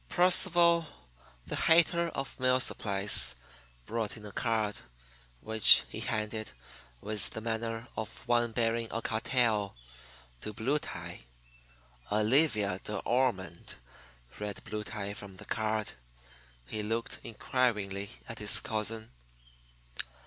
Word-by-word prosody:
Percival, 175 Hz, -2 st, +5 dB, 0.6 s
the -, -, -3 dB
hater 170 Hz, +1 st, +4 dB
of 135 Hz, -4 st, -6 dB
mill 130 Hz, 0 st, +3 dB
supplies, 100 Hz, -, +3 dB, 0.5 s
brought 115 Hz, -1 st, -3 dB
in 105 Hz, -, -11 dB
a 105 Hz, -, -7 dB
card, 110 Hz, -1 st, -1 dB, 0.6 s
which 110 Hz, -1 st, +7 dB
he -, -, -6 dB
handed, 110 Hz, -2 st, -3 dB, 0.5 s
with 105 Hz, -2 st, +3 dB
the -, -, -5 dB
manner 115 Hz, +1 st, -3 dB
of 110 Hz, +3 st, -7 dB
one 120 Hz, -1 st, +2 dB
bearing 115 Hz, 0 st, 0 dB
a 115 Hz, -, -3 dB
cartel, 110 Hz, -3 st, +1 dB, 0.7 s
to 105 Hz, -, -5 dB
Blue 130 Hz, +8 st, 0 dB
Tie. -, -, -7 dB, 0.9 s
"Olivia 105 Hz, -, +3 dB
De 105 Hz, -, -4 dB
Ormond," 95 Hz, -8 st, -1 dB, 0.6 s
read 105 Hz, -1 st, -5 dB
Blue 105 Hz, 0 st, -4 dB
Tie 105 Hz, -2 st, -5 dB
from 100 Hz, -3 st, -10 dB
the -, -, -10 dB
card. 110 Hz, 0 st, -1 dB, 0.7 s
He 105 Hz, -, -3 dB
looked 115 Hz, +2 st, -3 dB
inquiringly 105 Hz, -4 st, -1 dB, 0.2 s
at -, -, -7 dB
his -, -, +4 dB
cousin. 110 Hz, 0 st, -2 dB
110 Hz, 115 wpm, -30 LUFS, 105-120 Hz, 0.9 s, which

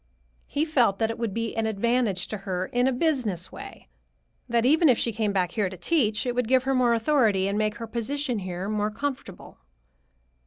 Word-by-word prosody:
He 295 Hz, +2 st, 0 dB
felt 245 Hz, -11 st, +2 dB
that 225 Hz, +1 st, 0 dB
it 225 Hz, -, -8 dB
would 230 Hz, -3 st, -1 dB
be 230 Hz, +2 st, -3 dB
an 225 Hz, -1 st, 0 dB
advantage 220 Hz, -3 st, 0 dB
to 215 Hz, -, -4 dB
her 185 Hz, -2 st, -3 dB
in 245 Hz, +5 st, +1 dB
a -, -, +2 dB
business 245 Hz, -, -1 dB
way: -, -, -11 dB, 0.6 s
that 235 Hz, 0 st, +2 dB
even 310 Hz, +4 st, +5 dB
if 245 Hz, -, +4 dB
she 235 Hz, -, 0 dB
came 215 Hz, -2 st, 0 dB
back 185 Hz, -3 st, 0 dB
here 205 Hz, -2 st, 0 dB
to 185 Hz, -, -9 dB
teach, 215 Hz, -, +1 dB
it 245 Hz, -, -1 dB
would 245 Hz, -2 st, -1 dB
give 255 Hz, +1 st, +3 dB
her 270 Hz, +1 st, 0 dB
more 245 Hz, -2 st, +3 dB
authority 225 Hz, -6 st, +2 dB
and 200 Hz, -, -1 dB
make 215 Hz, 0 st, 0 dB
her 230 Hz, -1 st, -6 dB
position 245 Hz, +2 st, -2 dB
here 185 Hz, 0 st, -5 dB
more 210 Hz, 0 st, 0 dB
comfortable." 255 Hz, -5 st, -6 dB
225 Hz, 205 wpm, -26 LUFS, 200-255 Hz, 0.6 s, even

